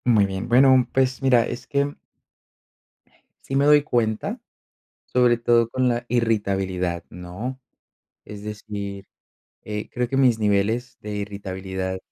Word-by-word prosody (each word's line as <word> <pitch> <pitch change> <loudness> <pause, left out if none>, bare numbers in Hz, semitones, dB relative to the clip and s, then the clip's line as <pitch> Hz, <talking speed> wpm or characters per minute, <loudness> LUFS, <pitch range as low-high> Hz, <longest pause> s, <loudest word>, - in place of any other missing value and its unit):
Muy 110 -5 +4
bien, 95 0 -4
bueno, 130 +1 +5
pues 130 -1 +1
mira, 125 -3 +4
es 120 - -6
que 140 0 0 1.5
sí 135 - -4
me 140 +1 +3
doy 150 0 +6
cuenta, 115 -6 -1 0.7
sobre 125 -1 +3
todo 115 -1 +3
con 130 +1 +1
la 120 0 -1
irritabilidad, 95 -7 0
¿no?, 90 +9 -7 0.6
es 105 -1 -10
decir, 100 -2 -6 0.6
eh, 105 0 -5
creo 125 -1 -2
que 135 - 0
mis 125 -4 +4
niveles 110 +4 0
de 105 0 -5
irritabilidad 95 -2 -4
110 Hz, 130 wpm, -23 LUFS, 100-125 Hz, 1.5 s, doy